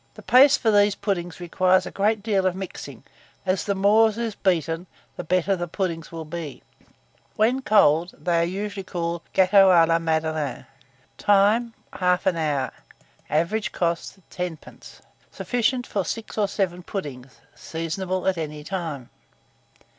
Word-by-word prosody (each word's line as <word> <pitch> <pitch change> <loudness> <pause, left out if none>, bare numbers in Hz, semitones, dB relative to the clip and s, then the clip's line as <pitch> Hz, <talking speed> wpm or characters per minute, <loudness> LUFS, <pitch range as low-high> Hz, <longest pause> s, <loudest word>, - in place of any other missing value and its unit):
The - - -12
paste 275 +3 +6
for 225 - +2
these 205 -1 +4
puddings 180 -4 -3
requires 185 +2 +2
a - - -6
great 210 +1 0
deal 200 -4 +1
of 185 - -1
mixing, 190 -1 -8 0.4
as 185 0 0
the 200 - 0
more 210 +3 +4
it 215 - -8
is 230 -2 -2
beaten, 170 -2 -1 0.3
the - - -6
better 185 +3 0
will 195 - +2
the 175 - -3
puddings 165 -3 -3 0.2
be. 155 -3 -7 0.7
When 225 +4 +2
served 265 - -9
cold, 175 -4 +4
they 175 -1 0
are 170 - +3
usually 195 +3 -4
called 170 -2 -3
gâteaux 190 +1 +6
à 170 -3 +6
la 165 0 +2
Madeleine. 160 -4 -2 0.5
Time. 210 +3 +3 0.2
1/2 180 0 +1
hour. 145 -5 -1 0.6
Average 175 +5 0
cost, 170 +2 -3
10d. 180 -3 -8 0.3
Sufficient 245 +1 -1
for 200 - -2
6 225 +4 -5
or 210 -2 +1
7 185 -3 -2
puddings. 140 -9 -7 0.2
Seasonable 180 +3 -4
at 185 -3 +1
any 150 -1 -5
time. 155 -7 -5
185 Hz, 150 wpm, -24 LUFS, 165-205 Hz, 0.7 s, paste